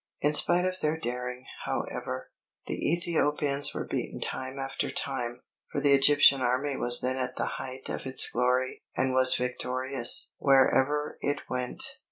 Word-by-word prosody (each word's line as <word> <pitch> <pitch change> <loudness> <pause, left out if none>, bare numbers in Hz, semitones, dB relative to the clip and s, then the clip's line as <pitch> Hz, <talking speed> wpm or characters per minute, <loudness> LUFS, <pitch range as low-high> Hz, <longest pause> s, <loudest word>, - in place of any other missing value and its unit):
In 150 +1 +2
spite 175 +4 +4
of 185 0 -2
their 155 +1 0
daring, 125 -1 -5 0.2
however, 65 - -4 0.3
the - - -2
Ethiopians 150 -4 0
were - - -3
beaten - - -4
time 130 +1 -4
after 135 0 -3
time; 125 -3 -3 0.3
for - - -1
the 140 -1 +3
Egyptian 140 0 +6
army 130 +3 0
was 120 -1 +2
then 130 +1 -1
at 125 0 -3
the - - -3
height 130 0 -7
of - - -5
its 130 - +4
glory, 125 +1 0 0.2
and 130 -1 +1
was 130 0 +4
victorious 125 0 +1
wherever 140 +2 +2
it 145 0 -1
went. 125 -1 -3
130 Hz, 155 wpm, -28 LUFS, 125-145 Hz, 0.3 s, Egyptian